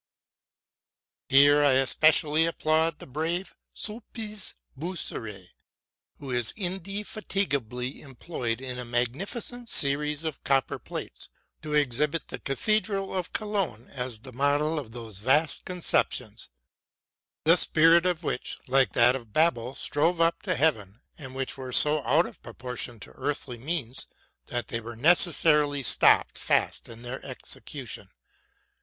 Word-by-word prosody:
Here 145 Hz, +2 st, +6 dB
I 140 Hz, -2 st, +5 dB
especially 155 Hz, +4 st, +4 dB
applaud 160 Hz, -1 st, +1 dB
the -, -, -11 dB
brave 165 Hz, +7 st, -3 dB, 0.2 s
Sulpiz 215 Hz, -1 st, -4 dB, 0.2 s
Boisserée, 115 Hz, -, -5 dB, 0.7 s
who 135 Hz, -2 st, -8 dB
is 120 Hz, -2 st, 0 dB
indefatigably 185 Hz, -, -3 dB
employed 130 Hz, -4 st, -4 dB
in 125 Hz, -1 st, -4 dB
a -, -, -3 dB
magnificent 175 Hz, -, -3 dB
series 150 Hz, +2 st, 0 dB
of 160 Hz, -3 st, -5 dB
copper 135 Hz, -1 st, +1 dB
plates -, -, -6 dB, 0.3 s
to 150 Hz, -1 st, -3 dB
exhibit 150 Hz, +3 st, +1 dB
the -, -, -6 dB
cathedral 200 Hz, +5 st, 0 dB
of 180 Hz, -2 st, -3 dB
Cologne 195 Hz, -, -2 dB
as 125 Hz, -4 st, -4 dB
the 130 Hz, +1 st, -11 dB
model 145 Hz, +4 st, +1 dB
of 120 Hz, -6 st, -9 dB
those 115 Hz, -4 st, -6 dB
vast 145 Hz, +7 st, +2 dB
conceptions, 125 Hz, -, 0 dB, 0.9 s
the 165 Hz, +2 st, +7 dB
spirit 165 Hz, +1 st, +5 dB
of 175 Hz, -2 st, -1 dB
which, 135 Hz, -, -3 dB
like 135 Hz, 0 st, +3 dB
that 120 Hz, +2 st, +6 dB
of 115 Hz, -5 st, -8 dB
Babel, 135 Hz, -6 st, +1 dB
strove 165 Hz, +4 st, +1 dB
up 165 Hz, 0 st, +2 dB
to 185 Hz, -3 st, -1 dB
heaven, 110 Hz, -10 st, 0 dB
and 130 Hz, -4 st, -9 dB
which 135 Hz, 0 st, -3 dB
were 130 Hz, -1 st, -6 dB
so 150 Hz, +3 st, +4 dB
out 165 Hz, +5 st, +4 dB
of -, -, -11 dB
proportion 120 Hz, 0 st, -6 dB
to -, -, -9 dB
earthly 140 Hz, -4 st, -4 dB
means 135 Hz, -3 st, -2 dB, 0.4 s
that 120 Hz, -1 st, -4 dB
they 115 Hz, -, -2 dB
were 115 Hz, +1 st, -8 dB
necessarily 150 Hz, -1 st, +3 dB
stopped -, -, +3 dB
fast -, -, 0 dB
in 115 Hz, +1 st, -11 dB
their 125 Hz, +2 st, -6 dB
execution. -, -, -6 dB
145 Hz, 130 wpm, -27 LUFS, 125-165 Hz, 0.9 s, the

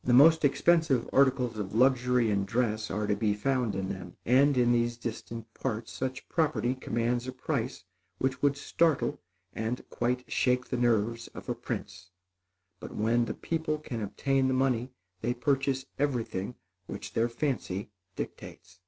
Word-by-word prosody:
The 120 Hz, -, +2 dB
most 160 Hz, +5 st, +7 dB
expensive 145 Hz, -2 st, +3 dB
articles 130 Hz, -4 st, +3 dB
of 100 Hz, 0 st, -4 dB
luxury 125 Hz, -2 st, +3 dB
and 100 Hz, -1 st, +1 dB
dress 110 Hz, 0 st, 0 dB
are 105 Hz, +1 st, -1 dB
to 105 Hz, 0 st, +1 dB
be 105 Hz, -2 st, +1 dB
found 125 Hz, -2 st, 0 dB
in 95 Hz, 0 st, -2 dB
them, 95 Hz, -3 st, -6 dB
and 135 Hz, +3 st, +4 dB
in 120 Hz, -1 st, +4 dB
these 120 Hz, 0 st, +1 dB
distant 115 Hz, -1 st, -6 dB
parts, 115 Hz, -3 st, -3 dB
such 130 Hz, 0 st, -4 dB
property 155 Hz, -6 st, +1 dB
commands 120 Hz, -1 st, -1 dB
a -, -, -2 dB
price 125 Hz, -7 st, -3 dB, 0.3 s
which 130 Hz, 0 st, -1 dB
would 140 Hz, -1 st, +3 dB
startle 160 Hz, +1 st, +1 dB, 0.3 s
and 110 Hz, +3 st, -3 dB
quite 125 Hz, +1 st, 0 dB
shake 125 Hz, 0 st, +1 dB
the -, -, -1 dB
nerves 115 Hz, -1 st, +1 dB
of -, -, -8 dB
a -, -, +2 dB
prince; 90 Hz, -, -6 dB, 0.7 s
but, -, -, -8 dB
when 115 Hz, +3 st, +2 dB
the -, -, -4 dB
people 160 Hz, -2 st, -1 dB
can 125 Hz, -6 st, -5 dB
obtain 135 Hz, +6 st, +1 dB
the 130 Hz, -, +1 dB
money, 130 Hz, -2 st, +1 dB, 0.3 s
they 120 Hz, +2 st, 0 dB
purchase 135 Hz, +1 st, 0 dB
everything 125 Hz, -6 st, -1 dB, 0.3 s
which 100 Hz, -, -7 dB
their 115 Hz, +1 st, +2 dB
fancy 115 Hz, -6 st, -2 dB, 0.2 s
dictates. 95 Hz, 0 st, -8 dB
125 Hz, 160 wpm, -29 LUFS, 110-135 Hz, 0.7 s, most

